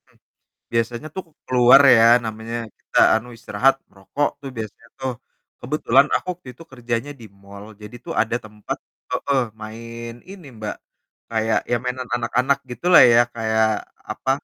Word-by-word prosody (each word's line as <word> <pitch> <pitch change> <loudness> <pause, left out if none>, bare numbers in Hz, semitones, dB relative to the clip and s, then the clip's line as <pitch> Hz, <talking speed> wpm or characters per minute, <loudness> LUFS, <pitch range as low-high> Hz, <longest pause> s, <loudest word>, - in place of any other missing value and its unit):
Mmm. - - -29 0.6
Biasanya 115 +4 -1
tuh 190 - -3
aku 165 - -29
keluar 125 +1 +6 0.2
ya, 115 0 +6 0.2
namanya 110 +1 -5 0.2
kita, - - -3 0.2
anu, 110 +2 -5
istirahat, 125 +5 +2
merokok 100 +9 -2
tuh 135 - -7
biasanya 110 +1 -8
tuh. 130 -1 -2 0.5
Kebetulan 135 0 +3
aku - - -5
waktu 170 - -16
itu 125 - -15
kerjanya 120 +1 -3
di - - -11 0.2
mall, 100 +1 -11 0.2
jadi 105 +2 -11
tuh - - -5
ada 115 +2 -2
tempat 105 -1 -7 0.3
heeh, 140 -2 +1 0.2
main 115 +2 -8 0.2
ini, 190 -5 -11
Mbak, 105 -1 -4 0.5
kayak 110 -1 +1
ya 120 - +3
mainan 125 0 -4
anak-anak 125 +3 +1
gitulah 170 +9 +5
ya, 120 -1 +6
kayak, 110 -1 +1 0.5
apa, 130 - -3
120 Hz, 155 wpm, -21 LUFS, 110-130 Hz, 0.6 s, keluar